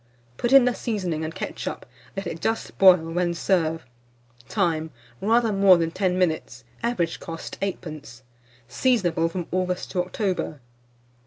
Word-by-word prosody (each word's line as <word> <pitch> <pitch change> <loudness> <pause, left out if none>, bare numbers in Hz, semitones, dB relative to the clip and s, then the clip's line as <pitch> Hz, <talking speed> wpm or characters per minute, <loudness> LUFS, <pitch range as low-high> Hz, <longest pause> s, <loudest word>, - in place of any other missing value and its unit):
Put 240 - -1
in 270 -2 +8
the 250 - +2
seasoning 185 -10 -2
and 160 +1 -5
ketchup; - - -5 0.3
let 195 - -3
it 165 - -5
just 225 0 -2
boil, 185 -2 +9
when 175 0 0
serve. 165 -3 0 0.6
Time. 165 -6 0 0.3
Rather 225 +1 +3
more 195 -2 +6
than 165 -1 -1
10 185 0 0
minutes. 160 -8 -1 0.2
Average 235 -8 -1
cost, 165 -1 -7
8d. 155 -9 -5 0.5
Seasonable 170 - +1
from 175 0 -4
August 180 0 -1
to 180 -2 +1
October. 185 -5 -2
180 Hz, 140 wpm, -24 LUFS, 165-200 Hz, 0.6 s, boil